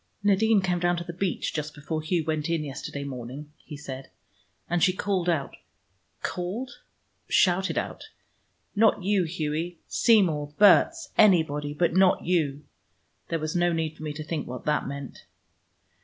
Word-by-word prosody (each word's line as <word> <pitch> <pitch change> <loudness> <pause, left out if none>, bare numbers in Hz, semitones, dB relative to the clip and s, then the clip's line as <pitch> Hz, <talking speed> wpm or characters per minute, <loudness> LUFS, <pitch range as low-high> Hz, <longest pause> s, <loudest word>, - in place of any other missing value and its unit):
"Nadine 205 +1 +4
came 180 -2 0
down 175 0 +1
to 175 - -3
the 170 - -7
beach 180 0 -2
just 150 -1 -4
before 155 +2 -4
Hugh 160 0 -1
went 155 -1 -1
in 165 -2 0
yesterday 140 0 -6
morning," 135 +2 -7
he 150 - -9
said, 135 -2 -8 0.6
"and 175 0 0
she 185 +1 +4
called 185 -2 -1
out 155 -5 -1 0.7
called? 195 +9 -4 0.5
shouted 190 +1 +3
out, - - -4 0.7
'Not 215 -2 +3
you, 195 -2 +2
Hughie: 160 +1 -3
Seymour, 160 -10 +2
Berts, 290 - +5
anybody, 150 -7 +4
but 170 +1 +1
not 190 -1 +4
you!' 150 -5 0 0.6
There 165 - -1
was 155 +1 -4
no 175 0 +3
need 160 -1 -2
for - - -15
me 155 -1 -3
to 155 +1 -6
think 155 -1 -4
what 125 0 -7
that 150 -3 0
meant." 140 -1 -7
165 Hz, 155 wpm, -26 LUFS, 150-185 Hz, 0.7 s, Berts